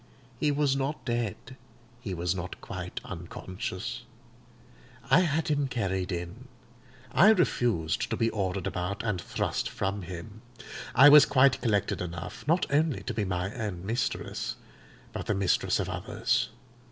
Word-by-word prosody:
He 150 Hz, -, +2 dB
was 145 Hz, -1 st, +2 dB
not 140 Hz, +3 st, -2 dB
dead; 120 Hz, -5 st, -1 dB, 0.7 s
he 100 Hz, -6 st, -4 dB
was 85 Hz, +1 st, 0 dB
not 90 Hz, -1 st, -6 dB
quite -, -, -6 dB
unconscious. 95 Hz, +3 st, -5 dB, 1.1 s
I -, -, +8 dB
had 160 Hz, -3 st, +1 dB
him 145 Hz, -2 st, +1 dB
carried 95 Hz, -7 st, -2 dB
in; 90 Hz, +9 st, -5 dB, 0.6 s
I 195 Hz, +7 st, +7 dB
refused 120 Hz, -, +2 dB
to -, -, -1 dB
be 115 Hz, 0 st, +1 dB
ordered 95 Hz, -3 st, -2 dB
about 90 Hz, +3 st, -3 dB
and 105 Hz, -6 st, -1 dB
thrust -, -, -2 dB
from 100 Hz, +1 st, -2 dB
him. 95 Hz, +4 st, -8 dB, 0.5 s
I 135 Hz, -, +9 dB
was 150 Hz, 0 st, +9 dB
quite 130 Hz, 0 st, +4 dB
collected 105 Hz, -4 st, +1 dB
enough, 85 Hz, -, -6 dB
not 170 Hz, +4 st, +3 dB
only 150 Hz, 0 st, +2 dB
to -, -, -3 dB
be 105 Hz, -2 st, -1 dB
my 95 Hz, +1 st, -2 dB
own 100 Hz, -7 st, -4 dB
mistress 115 Hz, +4 st, -2 dB, 0.6 s
but -, -, -5 dB
the 105 Hz, -, +1 dB
mistress 95 Hz, -2 st, +2 dB
of -, -, -1 dB
others. -, -, 0 dB
105 Hz, 145 wpm, -28 LUFS, 90-135 Hz, 1.1 s, I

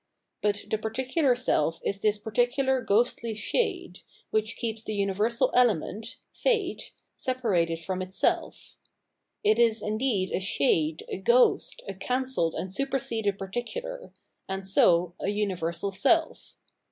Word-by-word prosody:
But 205 Hz, -1 st, 0 dB
the 220 Hz, -, +1 dB
particular 255 Hz, +5 st, +1 dB
self 165 Hz, -10 st, +1 dB
is 200 Hz, 0 st, -1 dB
this 210 Hz, -1 st, +2 dB
particular 245 Hz, +5 st, +1 dB
ghostly 230 Hz, +1 st, +1 dB
shade, 360 Hz, -, -1 dB, 0.3 s
which 215 Hz, +1 st, 0 dB
keeps 225 Hz, -2 st, -3 dB
the 215 Hz, -, -4 dB
universal 205 Hz, +4 st, +1 dB
element. 225 Hz, -1 st, +1 dB, 0.2 s
Fate, 445 Hz, -7 st, -1 dB, 0.3 s
separated 205 Hz, -, 0 dB
from 185 Hz, 0 st, -3 dB
itself. 185 Hz, +1 st, -2 dB, 0.7 s
It 215 Hz, +2 st, +3 dB
is 225 Hz, -2 st, +3 dB
indeed 215 Hz, -3 st, 0 dB
a -, -, 0 dB
shade, 155 Hz, -3 st, +1 dB
a -, -, -4 dB
ghost, 240 Hz, +6 st, +3 dB
a 195 Hz, -, -4 dB
cancelled 250 Hz, -4 st, -1 dB
and 190 Hz, 0 st, -4 dB
superseded 230 Hz, -5 st, -1 dB
particular, -, -, -5 dB, 0.4 s
and 190 Hz, 0 st, -4 dB
so 175 Hz, -2 st, +4 dB
a -, -, -3 dB
universal 195 Hz, -3 st, -1 dB
self. 320 Hz, -, +1 dB
215 Hz, 125 wpm, -27 LUFS, 190-250 Hz, 0.7 s, so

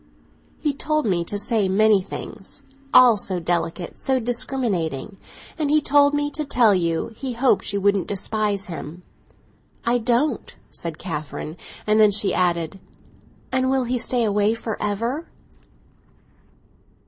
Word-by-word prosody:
"He 295 Hz, -2 st, 0 dB
told 305 Hz, +2 st, -1 dB
me 180 Hz, -5 st, +1 dB
to 205 Hz, -, -4 dB
say 205 Hz, -1 st, +1 dB
many 210 Hz, +1 st, +4 dB
things—all 255 Hz, +5 st, +1 dB
so 190 Hz, -2 st, -3 dB
delicate, 170 Hz, 0 st, -2 dB
so 265 Hz, -1 st, +1 dB
discriminating. 220 Hz, -, -2 dB, 0.4 s
And 300 Hz, -2 st, 0 dB
he 305 Hz, +1 st, +5 dB
told 285 Hz, 0 st, +4 dB
me 290 Hz, 0 st, 0 dB
to 305 Hz, -, -3 dB
tell 240 Hz, -7 st, +4 dB
you 170 Hz, +2 st, 0 dB
he 260 Hz, +1 st, -4 dB
hoped 245 Hz, -1 st, +1 dB
you 200 Hz, -, -1 dB
wouldn't 200 Hz, -2 st, +2 dB
despise 205 Hz, 0 st, -1 dB
him." 170 Hz, 0 st, -8 dB, 0.8 s
"I 240 Hz, +1 st, +2 dB
don't," 240 Hz, +2 st, 0 dB, 0.2 s
said 165 Hz, -2 st, -5 dB
Catherine. 155 Hz, -2 st, -5 dB, 0.3 s
And 215 Hz, +1 st, +3 dB
then 215 Hz, -1 st, +7 dB
she 205 Hz, -1 st, +1 dB
added: 175 Hz, 0 st, 0 dB, 0.7 s
"And 260 Hz, 0 st, +1 dB
will 265 Hz, -1 st, +2 dB
he 245 Hz, +1 st, -1 dB
stay 245 Hz, 0 st, +1 dB
away 210 Hz, +1 st, +2 dB
for 225 Hz, -2 st, -4 dB
ever?" 230 Hz, +10 st, -2 dB
215 Hz, 135 wpm, -22 LUFS, 190-255 Hz, 0.8 s, then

